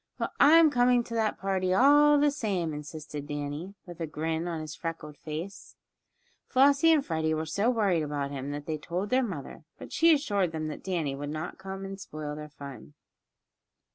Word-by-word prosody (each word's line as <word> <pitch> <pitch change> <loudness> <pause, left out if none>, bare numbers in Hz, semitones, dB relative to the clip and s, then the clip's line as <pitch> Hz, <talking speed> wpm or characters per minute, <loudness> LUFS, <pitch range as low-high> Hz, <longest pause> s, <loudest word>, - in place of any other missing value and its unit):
"Well, - - -2
I'm 315 +1 +7
coming 245 -1 +3
to 230 - -9
that 220 -2 0
party 185 -1 0
all 290 +4 +6
the 290 0 +4
same!" 195 - -2
insisted 150 -1 -7
Danny, 145 +6 -5
with 175 -2 -11
a 165 - -2
grin 160 +2 -2
on 165 -2 -3
his 155 -1 -6
freckled 165 -3 -6
face. 160 +6 -7 0.7
Flossie 280 +4 +5
and 300 -4 +3
Freddie 160 -1 0
were 160 +1 -2
so 200 +9 0
worried 205 -9 +2
about 145 -2 -3
him 140 0 -5
that 145 0 -5
they 155 0 -3
told 180 +6 -4
their 260 +1 +4
mother, 170 - -6
but - - -10
she 330 +1 +5
assured 205 - +1
them 155 -1 -3
that 150 - -8
Danny 165 -7 -2
would 145 +1 -5
not 155 +5 -5
come 190 0 -6
to 195 0 -5
spoil 155 -5 -6
their 150 0 -8
fun. 140 0 -11
170 Hz, 190 wpm, -28 LUFS, 150-225 Hz, 0.7 s, I'm